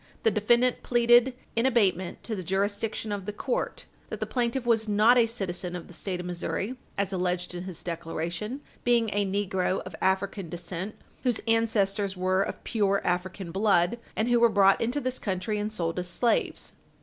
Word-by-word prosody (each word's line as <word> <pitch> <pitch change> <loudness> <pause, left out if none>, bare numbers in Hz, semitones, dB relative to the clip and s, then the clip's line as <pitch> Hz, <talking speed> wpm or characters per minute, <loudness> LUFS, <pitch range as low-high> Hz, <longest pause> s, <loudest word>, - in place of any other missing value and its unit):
The 225 - +4
defendant 235 +4 +3
pleaded 240 +1 +4 0.2
in 230 +3 +3
abatement 190 -8 +1
to 225 - -3
the 190 - -4
jurisdiction 205 +4 -1
of 200 -2 -4
the - - -1
court, - - -3 0.2
that - - -5
the - - -1
plaintiff 245 0 -1
was 225 -2 +2
not 215 +4 +5
a 235 -2 +5
citizen 180 -5 -3
of 175 - -6
the - - -12
State 180 +1 -4
of 180 - -5
Missouri, 180 +6 -3 0.2
as 200 -1 -1
alleged 180 -1 -1
in 175 +1 -5
his 185 -4 -7
declaration, 170 - -4 0.2
being 235 -3 +3
a 205 0 +2
negro 190 -1 0
of 185 -3 -8
African 190 -1 0
descent, 175 +4 -5 0.3
whose 245 -4 +1
ancestors 205 -4 +1
were 185 +1 +2
of - - -3
pure 200 -3 +1
African 180 0 -2
blood 195 +2 +2 0.2
and 220 - +1
who 240 -1 +4
were 235 0 +6
brought 195 -2 +4
into 245 +5 0
this 255 -2 -3
country 200 +2 -2
and 210 +1 -2
sold 170 -4 -2
as 180 - -4
slaves. 230 +6 0
200 Hz, 185 wpm, -27 LUFS, 185-230 Hz, 0.3 s, were